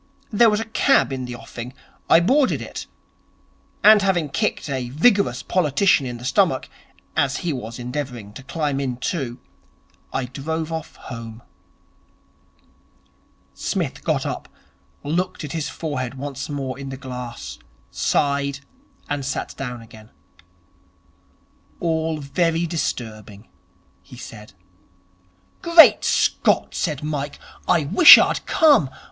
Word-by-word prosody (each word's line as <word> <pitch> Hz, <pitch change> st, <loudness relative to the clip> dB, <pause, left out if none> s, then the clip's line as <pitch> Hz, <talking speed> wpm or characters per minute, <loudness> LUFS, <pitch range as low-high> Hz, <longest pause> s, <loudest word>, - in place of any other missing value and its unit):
There 230 Hz, +2 st, +5 dB
was 210 Hz, 0 st, +1 dB
a 225 Hz, -, -3 dB
cab 225 Hz, -, +2 dB
in 130 Hz, -1 st, -4 dB
the 125 Hz, 0 st, -6 dB
offing. 120 Hz, +1 st, -9 dB, 0.4 s
I 165 Hz, -, +6 dB
boarded 260 Hz, +9 st, +2 dB
it. -, -, -7 dB, 1.0 s
And, 215 Hz, 0 st, +8 dB
having 180 Hz, -6 st, +1 dB
kicked -, -, -2 dB
a 130 Hz, -3 st, -3 dB
vigorous 200 Hz, -, +2 dB
politician 160 Hz, -3 st, +2 dB
in 120 Hz, -1 st, -5 dB
the 120 Hz, -, -10 dB
stomach, -, -, +1 dB, 0.5 s
as 140 Hz, -3 st, +1 dB
he 165 Hz, -, 0 dB
was 115 Hz, -3 st, -6 dB
endeavouring 125 Hz, -4 st, -6 dB
to 120 Hz, -, -10 dB
climb 145 Hz, 0 st, -2 dB
in 130 Hz, -3 st, -3 dB
too, 130 Hz, -3 st, -3 dB, 0.7 s
I 130 Hz, -, -2 dB
drove 160 Hz, +5 st, -4 dB
off 160 Hz, -1 st, -6 dB
home.' 115 Hz, -1 st, -9 dB, 2.1 s
Psmith -, -, -3 dB
got -, -, 0 dB
up, -, -, -5 dB, 0.5 s
looked 180 Hz, +5 st, -2 dB
at 150 Hz, -, -6 dB
his 160 Hz, -3 st, -3 dB
forehead 135 Hz, -5 st, -4 dB
once 135 Hz, +1 st, -6 dB
more 135 Hz, -2 st, -4 dB
in 135 Hz, -1 st, -6 dB
the 135 Hz, -, -6 dB
glass, 125 Hz, -, -8 dB, 0.3 s
sighed, 140 Hz, -1 st, 0 dB, 0.5 s
and 145 Hz, -1 st, -3 dB
sat 135 Hz, +1 st, -4 dB
down 125 Hz, -3 st, -6 dB
again. 110 Hz, -1 st, -15 dB, 1.7 s
'All 160 Hz, -1 st, -1 dB
very 165 Hz, +4 st, 0 dB
disturbing,' 110 Hz, -, -5 dB, 0.5 s
he -, -, -14 dB
said. 105 Hz, -1 st, -11 dB, 1.1 s
'Great 335 Hz, -1 st, +7 dB
Scott,' -, -, +1 dB
said 150 Hz, -5 st, -2 dB
Mike, 145 Hz, -2 st, -4 dB, 0.3 s
'I 170 Hz, -4 st, +3 dB
wish 335 Hz, -, +11 dB
I'd -, -, +1 dB
come. 290 Hz, -, +4 dB
140 Hz, 125 wpm, -22 LUFS, 125-165 Hz, 2.1 s, wish